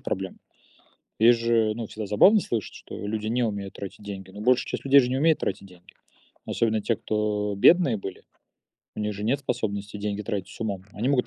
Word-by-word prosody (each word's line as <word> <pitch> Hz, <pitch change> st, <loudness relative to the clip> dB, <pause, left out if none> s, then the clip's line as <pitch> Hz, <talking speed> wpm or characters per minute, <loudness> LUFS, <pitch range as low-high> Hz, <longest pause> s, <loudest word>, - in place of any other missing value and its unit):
проблема. 95 Hz, 0 st, -4 dB, 0.8 s
Есть 115 Hz, +1 st, +6 dB
же 115 Hz, -2 st, +2 dB
всегда 110 Hz, +1 st, -6 dB
забавно 190 Hz, -, +6 dB
слышать, 115 Hz, -, -3 dB
что -, -, -10 dB
люди 110 Hz, 0 st, -3 dB
не 120 Hz, +2 st, +1 dB
умеют 100 Hz, -3 st, -3 dB
тратить 100 Hz, +1 st, -8 dB
деньги. 95 Hz, -2 st, -8 dB
Но 105 Hz, -, -9 dB
большая 125 Hz, +3 st, +3 dB
часть -, -, -5 dB
людей 140 Hz, +1 st, +7 dB
же 125 Hz, -2 st, +1 dB
не 130 Hz, -, 0 dB
умеет 160 Hz, +2 st, +3 dB
тратить 100 Hz, -, -3 dB
деньги. 90 Hz, -1 st, -18 dB, 0.5 s
Особенно 110 Hz, -2 st, 0 dB
те, 115 Hz, -, 0 dB
кто 105 Hz, -1 st, -1 dB
бедные 140 Hz, -, +5 dB
были. 95 Hz, -1 st, -8 dB, 0.7 s
У -, -, -3 dB
них 105 Hz, 0 st, -1 dB
же 100 Hz, -, -6 dB
нет 130 Hz, +6 st, +1 dB
способности 105 Hz, -6 st, -3 dB
деньги 105 Hz, 0 st, -3 dB
тратить 100 Hz, -3 st, -4 dB
с -, -, -13 dB
умом. 100 Hz, -4 st, -3 dB
Они 115 Hz, +5 st, -2 dB
могут 135 Hz, -3 st, +2 dB
110 Hz, 195 wpm, -26 LUFS, 100-120 Hz, 0.8 s, людей